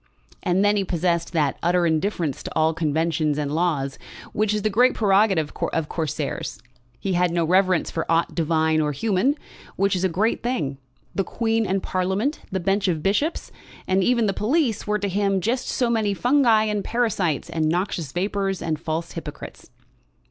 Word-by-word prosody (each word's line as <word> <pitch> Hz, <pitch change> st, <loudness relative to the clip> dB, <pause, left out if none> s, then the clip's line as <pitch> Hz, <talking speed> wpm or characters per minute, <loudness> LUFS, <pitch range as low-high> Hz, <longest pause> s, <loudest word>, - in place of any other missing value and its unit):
And 185 Hz, +3 st, +2 dB
then 205 Hz, 0 st, +3 dB
he 200 Hz, -, +1 dB
possessed 170 Hz, -1 st, 0 dB
that 150 Hz, -4 st, +1 dB
utter 175 Hz, 0 st, +2 dB
indifference 160 Hz, -2 st, 0 dB
to -, -, -7 dB
all 160 Hz, 0 st, +3 dB
conventions 160 Hz, -1 st, 0 dB
and 145 Hz, -1 st, -2 dB
laws, 150 Hz, -5 st, -1 dB, 0.3 s
which 210 Hz, 0 st, +1 dB
is 210 Hz, -1 st, -1 dB
the 215 Hz, -, +2 dB
great 245 Hz, +5 st, +4 dB
prerogative 195 Hz, -7 st, +3 dB, 0.2 s
of 160 Hz, -2 st, -1 dB
Corsairs. 155 Hz, -8 st, -3 dB, 0.4 s
He 195 Hz, -, -2 dB
had 180 Hz, 0 st, +2 dB
no 170 Hz, -1 st, 0 dB
reverence 185 Hz, +1 st, +2 dB
for 165 Hz, -, -3 dB
aught 165 Hz, +1 st, +2 dB
divine 160 Hz, -1 st, +1 dB
or 150 Hz, -1 st, 0 dB
human, 220 Hz, -, +1 dB, 0.4 s
which 195 Hz, 0 st, +1 dB
is 180 Hz, -, -1 dB
a 190 Hz, -, +3 dB
great 205 Hz, +7 st, 0 dB
thing. 155 Hz, -, -2 dB, 0.3 s
The 195 Hz, -, 0 dB
Queen 225 Hz, +2 st, 0 dB
and 190 Hz, 0 st, 0 dB
Parliament, 190 Hz, +10 st, -1 dB
the 190 Hz, -, -1 dB
bench 195 Hz, +3 st, +1 dB
of 160 Hz, -4 st, -1 dB
bishops, 250 Hz, -, 0 dB, 0.3 s
and 190 Hz, 0 st, +2 dB
even 235 Hz, 0 st, +3 dB
the 200 Hz, -, +1 dB
police, 235 Hz, -, 0 dB
were 210 Hz, 0 st, +1 dB
to 205 Hz, -1 st, -2 dB
him 195 Hz, 0 st, +1 dB
just 235 Hz, +7 st, -1 dB
so 250 Hz, -, 0 dB
many 220 Hz, -4 st, +1 dB
fungi 245 Hz, -2 st, +4 dB
and 210 Hz, -2 st, -1 dB
parasites, 205 Hz, -, 0 dB
and 155 Hz, -1 st, 0 dB
noxious 170 Hz, -4 st, -1 dB
vapours, 195 Hz, +1 st, -1 dB
and 155 Hz, -2 st, -2 dB
false 160 Hz, +1 st, -3 dB
hypocrites. 160 Hz, -3 st, -8 dB
185 Hz, 175 wpm, -23 LUFS, 165-210 Hz, 0.4 s, great